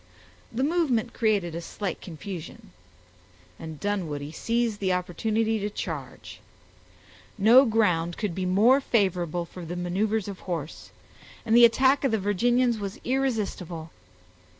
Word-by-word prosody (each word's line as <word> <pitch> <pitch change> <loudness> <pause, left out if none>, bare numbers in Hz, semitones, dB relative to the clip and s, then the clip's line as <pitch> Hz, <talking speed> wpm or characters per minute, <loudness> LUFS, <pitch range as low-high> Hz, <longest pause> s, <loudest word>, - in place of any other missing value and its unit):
The 250 +4 -1
movement 275 -8 +1
created 205 -7 +1
a 170 - -4
slight 200 +3 -5
confusion; 175 - -8 0.9
and 160 -2 -8
Dunwoodie 160 -8 -3
seized 230 +4 -1
the 190 -2 0
opportunity 215 +5 -1
to 205 +1 -2
charge. - - -7 1.0
No 230 +6 +7
ground 180 -7 +1
could 205 -5 -2
be 185 +1 -2
more 225 +9 +4
favorable 180 - 0
for 180 +1 -10
the 170 +2 -5
maneuvers 195 +4 -1
of 200 -2 -7
horse, 165 -4 -6 0.6
and 225 0 +2
the 240 0 +9
attack 260 +4 +3
of 270 - +3
the 220 - +1
Virginians 235 +4 +1
was 200 -1 -5
irresistible. 205 - -2
205 Hz, 130 wpm, -26 LUFS, 175-230 Hz, 1.0 s, the